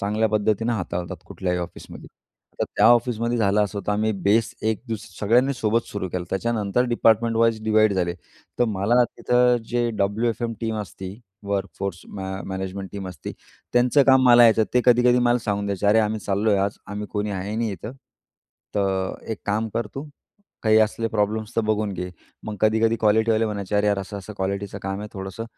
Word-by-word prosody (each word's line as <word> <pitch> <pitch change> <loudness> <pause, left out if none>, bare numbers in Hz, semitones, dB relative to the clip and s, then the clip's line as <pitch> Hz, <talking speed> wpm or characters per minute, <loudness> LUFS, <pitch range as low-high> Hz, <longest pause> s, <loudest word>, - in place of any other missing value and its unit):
चांगल्या 105 +2 +1
पद्धतीनं 110 +2 +1
हाताळतात 90 -5 -3
कुठल्याही 90 -1 -2
ऑफिसमध्ये. 90 0 -8 0.5
तर - - +3
त्या - - +5
ऑफिसमध्ये 120 0 +3
झालं 105 -1 +3
असं 100 0 -5
तर 105 - +1
आम्ही 110 +1 +1
बेस 110 +4 +2 0.2
एक 110 - -4
दुसरी 105 -4 -6
सगळ्यांनी 120 +6 +3
सोबत 115 -1 0
सुरू 100 -2 -4
केलं, 90 0 -4
त्याच्यानंतर 110 +2 0
डिपार्टमेंट 115 0 +3
वाईज 115 -1 +2
डिव्हाईड 110 -1 +4
झाले. 90 -2 -1 0.4
तर 120 - +4
मला 110 +3 +2
तिथं 125 0 +2
जे 120 0 0
डब्लू-एफ-एम 115 +4 0
टीम 110 -1 -2
असती 95 0 -8 0.3
वर्क 100 -1 -1
फोर्स 100 -2 -3
मॅ 95 -1 -6 0.2
मॅनेजमेंट 95 0 -5
टीम 100 -2 -5
असती 90 - -7 0.4
त्यांचं 125 +4 +4
काम 130 -1 +6
मला 120 -1 +8
यायचं 110 -1 +5
ते 125 - +5
कधी-कधी 125 0 +5
मला 120 0 +3
सांगून 100 -3 -2
द्यायचे 100 0 -2
"अरे, 105 +2 +5
आम्ही 110 0 -1
चाललोय, 100 +1 +1
आज 100 +1 -1
आम्ही 105 +1 -5
कोणी 105 0 -2
आहे 100 +2 -4
नाही 115 -2 -1
इथं. 100 +5 -7 0.8
तर 95 -2 0 0.2
एक 110 - -3
काम 110 +2 0
कर 115 -1 -1
तू, 135 - -4 0.6
काही 110 -1 +5
असले 110 +1 0
प्रॉब्लेम्स 110 +1 -1
तर - - +4
बघून 110 -1 0
घे." 90 0 -5 0.3
मग 105 -1 -5
कधी-कधी 110 +1 +3
क्वालिटीवाले 110 +1 +3
म्हणायचे, 105 -1 -4
"अरे 105 0 +2
यार, 100 -1 +2
असं-असं 100 +1 -7
क्वालिटीचं 100 +1 -3
काम 95 +1 -3
आहे 105 - -6
थोडंसं, 95 +3 -6
105 Hz, 180 wpm, -23 LUFS, 100-115 Hz, 0.8 s, मला